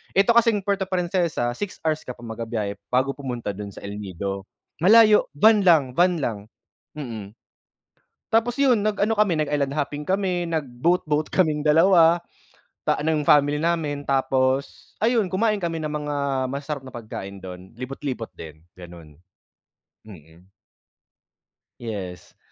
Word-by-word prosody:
'Eto 200 +4 +5
kasing 230 -4 +3
Puerto 195 -1 -1
Princesa, 175 -9 0
6 185 +10 -5
hours 155 -1 0
ka 125 - -5
pa 120 - -15
magbibiyahe 110 -3 -4
bago 130 +2 +1
pumunta 125 -7 -5
dun 100 0 -7
sa - - -12
El 100 +1 -6
Nido. 95 0 -5 0.3
Malayo 215 +4 +6
van 215 +7 +5
lang, 165 -6 +6
van 175 -1 +3
lang, 115 -6 -2 0.6
mm. 115 -8 -7 1.0
Tapos 230 +3 +2
yun 255 -6 +3
nag-ano 215 +1 +1
kami, 205 -6 +2
nag-island 145 -2 0
hopping 145 0 -2
kami, 185 -3 0
nag-boat-boat 155 +1 0
kaming 155 -5 +1
2 165 +2 +5 0.7
ta - - +1
ng 155 -1 0
family 145 0 +4
namin. 155 -4 -1
Tapos 135 0 0
ayun, 225 -3 +2
kumain 210 +1 +1
kami 165 -2 -2
ng 155 - -3
mga 150 -1 -3 0.4
masasarap 140 -1 -5
na 130 - -11
pagkain 100 -4 -8
dun, 90 0 -10
libot-libot 130 -2 -5
din, 80 -1 -10 0.2
gano'n. 85 -4 -13 0.9
Mm. 85 -3 -15 1.4
Yes. 100 -6 -7
150 Hz, 135 wpm, -23 LUFS, 115-180 Hz, 1.4 s, Malayo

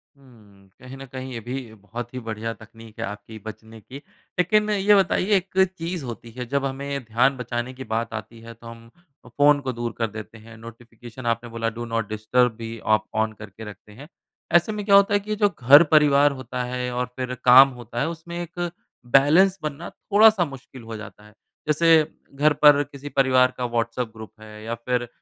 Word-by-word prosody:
हुँ। 105 -8 -21
कहीं 130 +1 -10
न 135 - -9
कहीं 130 0 -8
ये 115 - -5
भी 120 0 -7
बहुत 115 +4 -9
ही 130 - -4
बढ़िया 110 +1 -4
तकनीक 115 0 -15
है - - -2
आपकी 105 +2 -9
बचने 110 +1 -11
की। 130 +6 -11 0.4
लेकिन 210 +4 +2
ये 205 0 +4
बताइए 195 +1 +2
एक 185 +1 -5 0.3
चीज़ 170 -2 -4
होती 115 -1 -8
है 125 - -4
जब 140 -1 +1
हमें 140 0 -4
ध्यान 125 +4 +1
बचाने 120 +1 -4
की 130 +1 -8
बात 115 0 -3
आती 110 +1 -8
है 115 0 -11
तो 115 +1 -15
हम 115 0 -12 0.4
अ, - - -14
फ़ोन 145 0 +4
को 130 -1 -3
दूर 120 0 -4
कर 115 -1 0
देते 110 +1 -10
हैं। 115 +1 -14
नोटिफ़िकेशन 115 +2 -12
आपने 115 0 -1
बोला 115 0 -2
डू 120 - -4
नॉट 115 -2 -2
डिस्टर्ब 115 +3 +1
भी 115 0 -7 0.2
आप 105 0 -4 0.2
ऑन 110 0 -4
करके 110 +1 -11
रखते 105 +1 -15
हैं। 140 +7 -12 0.5
ऐसे 175 +5 +4
में 210 -1 -4
क्या 200 -1 +5
होता 200 +1 +5
है 205 - +4
कि 215 +1 -4
जो 205 -1 +2
घर 145 0 +6
परिवार 145 -1 +5
होता 130 -2 -5
है 125 0 -4
और 125 0 -1
फिर 125 -1 -4
काम 130 +2 +9
होता 120 0 -7
है - - 0
उसमें 170 +1 -8
एक 175 0 -4 0.4
बैलेंस 170 +8 +5
बनना 155 +2 -5
थोड़ा-सा 210 -3 +4
मुश्किल 135 -2 -11
हो 115 0 -8
जाता 105 -1 -11
है। 105 - -18 0.3
जैसे 155 +2 +2 0.5
घर 150 +2 +3
पर 145 0 +6
किसी 145 0 -10
परिवार 130 -2 +3
का 125 - -2
व्हाट्सएप 120 0 -2
ग्रुप 110 -1 -10
है 105 0 -12
या 115 +1 -4
फिर 120 +1 -2
125 Hz, 205 wpm, -23 LUFS, 115-145 Hz, 0.5 s, काम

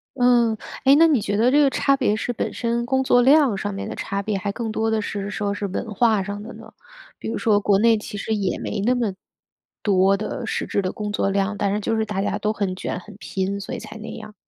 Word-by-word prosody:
嗯， 240 -3 +3 0.3
诶， 270 +1 +7
那 330 +3 +6
你 285 -8 +3
觉 205 0 -1
得 240 +3 +4
这 290 +2 +5
个 280 - +5
差 275 +1 +2
别 250 -6 +1
是 245 +3 -3
本 - - -3
身 235 0 -1
工 265 +2 +1
作 245 -1 +4
量 275 -3 +5
上 205 +1 -3
面 195 - -5
的 - - -5
差 200 0 -3
别 200 0 -2
还 200 +1 -2
更 225 +1 -4
多 220 +1 0
的 220 -1 +1
是 205 -1 -4
说 205 -1 -2
是 205 0 -3
文 210 +3 -4
化 220 -1 +3
上 205 +1 -5
的 225 +3 -8
呢？ - - -13 0.5
比 - - -5
如 - - -2
说 210 -2 +3
国 205 -1 +3
内 225 +1 +4
其 210 -1 -7
实 220 +2 -2
也 195 -3 -1
没 - - -3
那 245 +4 +2
么， 230 -5 -1 0.7
多 195 -1 +3
的 215 +3 -4
实 - - -2
质 200 - 0
的 185 - -2
工 210 -1 -5
作 195 - 0
量， 200 +1 0
但 200 0 0
是 210 - 0
就 225 +2 -1
是 220 - +1
大 200 -2 -2
家 200 - -1
都 210 - 0
很 200 -4 -2
卷、 185 - -4
很 210 +2 -13
拼， 195 -1 -3
所 195 - -6
以 - - -4
才 220 - -10
那 220 - -7
样？ 215 -1 -10
215 Hz, 280 characters per minute, -22 LUFS, 200-235 Hz, 0.7 s, 诶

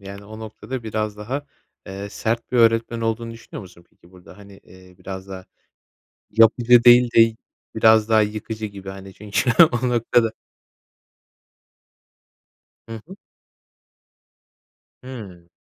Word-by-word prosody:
yani, 100 +1 -11
o 110 +1 -11
noktada 110 +3 -8
biraz 110 -1 -4
daha, 130 +8 -5 0.4
eee, 100 +1 -7
sert 115 +2 -3
bir 125 - 0
öğretmen 115 0 +2
olduğunu 115 +1 -3
düşünüyor 115 0 -11
musun 85 -2 -16
peki 85 - -24
burada? 90 +1 -16
Hani, 100 -1 -15
eee, 95 0 -18
biraz 95 +1 -9
daha 95 -1 -9 0.9
yapıcı 115 +2 +4
değil 120 0 +6
de 115 -1 +5 0.4
biraz 110 0 +4
daha 110 -1 +4
yıkıcı 110 +1 -5
gibi, 100 -2 -11
hani, 95 0 -11
çünkü 105 +4 -2 0.3
o 125 - +1
noktada 115 -1 +1 2.6
Hı 115 - -7
hı. 190 - -12 1.9
Hıı. 100 -10 -11
110 Hz, 125 wpm, -21 LUFS, 100-115 Hz, 2.6 s, değil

